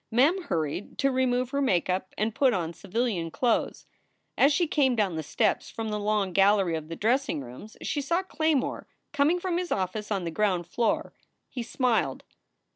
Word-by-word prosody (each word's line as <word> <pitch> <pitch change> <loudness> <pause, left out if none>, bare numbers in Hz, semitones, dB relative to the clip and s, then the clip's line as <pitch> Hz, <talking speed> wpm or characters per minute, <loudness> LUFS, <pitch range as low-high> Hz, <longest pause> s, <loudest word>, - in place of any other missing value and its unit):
Mem 285 +11 +3
hurried 160 +3 -3
to 275 -1 +2
remove 255 -1 +1
her 280 0 0
make 190 -11 +2
up 185 0 -2
and 215 +1 0
put 260 0 +3
on 170 -2 -2
civilian 200 -4 -2
clothes. 235 +7 0 0.5
As 280 - +5
she 345 +4 +2
came 280 -5 +2
down 200 -6 0
the 160 - -2
steps 210 +7 0
from 225 -1 -4
the 210 0 -2
long 205 -2 0
gallery 195 -2 +4
of 155 0 -6
dressing 240 - +1
rooms 130 - -11
she 290 - -1
saw 340 +7 0
Claymore 315 -6 -1 0.3
coming 305 +5 +3
from 355 -1 -1
his 360 -1 -4
office 195 +3 -2
on 200 -4 -1
the 170 - -3
ground 185 -1 0
floor. 305 - -1 0.4
He 250 - -5
smiled. 240 0 0
225 Hz, 180 wpm, -27 LUFS, 185-275 Hz, 0.5 s, As